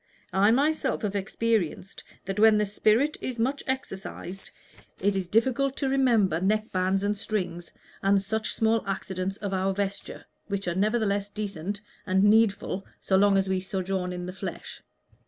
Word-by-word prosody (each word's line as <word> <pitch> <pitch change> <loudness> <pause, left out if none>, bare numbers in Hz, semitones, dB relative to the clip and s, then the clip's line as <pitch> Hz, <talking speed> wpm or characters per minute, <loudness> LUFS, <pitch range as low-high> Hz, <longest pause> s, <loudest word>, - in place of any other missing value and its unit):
"I 195 +2 +4
myself 275 +1 +1
have 205 -1 -1
experienced 200 -2 -1 0.2
that 195 +2 -3
when 220 0 +7
the 210 - +2
spirit 220 +8 +2
is 255 -2 -4
much 265 +5 0
exercised 195 -6 -5 0.5
it 200 +1 +1
is 190 -2 -1
difficult 260 +6 +1
to 275 - 0
remember 230 -11 +3
neck 215 +3 +1
bands 190 +1 +1
and 205 +1 +1
strings 180 -5 -3 0.3
and 195 0 +4
such 220 +3 -2
small 225 0 +2
accidents 190 0 -3
of 200 -2 -4
our 190 0 0
vesture, 200 0 -4 0.2
which 200 -2 -3
are 175 - +1
nevertheless 205 0 +1
decent 205 -1 -4 0.3
and 190 0 +3
needful 205 -2 +3 0.2
so 190 - 0
long 200 0 +5
as 195 0 +1
we 190 0 +1
sojourn 185 -1 -2
in 180 0 -5
the 180 - -6
flesh. 190 - -7
200 Hz, 160 wpm, -27 LUFS, 190-220 Hz, 0.5 s, when